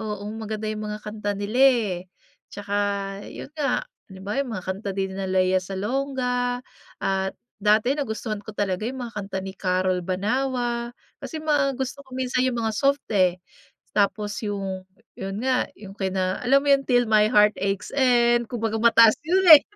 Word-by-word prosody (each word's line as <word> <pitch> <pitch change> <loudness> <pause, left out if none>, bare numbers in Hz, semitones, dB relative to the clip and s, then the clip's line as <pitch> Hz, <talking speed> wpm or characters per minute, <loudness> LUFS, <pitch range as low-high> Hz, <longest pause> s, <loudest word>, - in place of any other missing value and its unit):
Oo, 210 -2 -4 0.2
maganda 215 0 -4
yung 215 0 -4
mga 210 - -4
kanta 210 -1 -4
nila, 205 +4 -3
eh. 240 -8 +5 0.6
'Tsaka 205 0 -5 0.6
yun - - -8
nga, 285 -4 0 0.3
halimbawa 195 +7 -3
yung 245 -4 -7
mga 180 - -9
kanta 195 +2 -3
din 190 -1 -1
nila 195 -1 -3
Lea 185 0 +3
Salonga 245 +5 -1 0.4
at 190 0 -1 0.3
dati 215 +5 +4
nagustuhan 220 -6 -3
ko 220 - -8
talaga 195 -1 -1
yung 260 -1 -5
mga 230 - -11
kanta 195 -2 -4
ni 190 - -5
Carol 185 -1 0
Banawa. 235 +5 -1 0.3
Kasi 320 - -5
mga 290 -4 +1
gusto 265 +2 -3
ko 265 - -24
minsan 255 0 0
yung 255 -2 0
mga 225 -1 0
soft, 280 +3 +1
eh. 185 -2 +3 0.6
Tapos 205 0 0
yung, 195 -2 -4 0.3
yun 195 0 -4
nga, 260 -1 +1
yung 195 -2 -10
kina 190 -1 -1
alam 275 +3 +4
mo 285 - +2
yun, 275 0 +4
Till 245 -1 +4
my 215 0 +5
Heart 210 -2 +4
Aches 195 +1 -2
End, 240 -3 +3
kumbaga 225 -2 -1
mataas 230 -1 +7
yun, 365 +5 +2
eh. 285 - +7
215 Hz, 170 wpm, -24 LUFS, 195-255 Hz, 0.6 s, mataas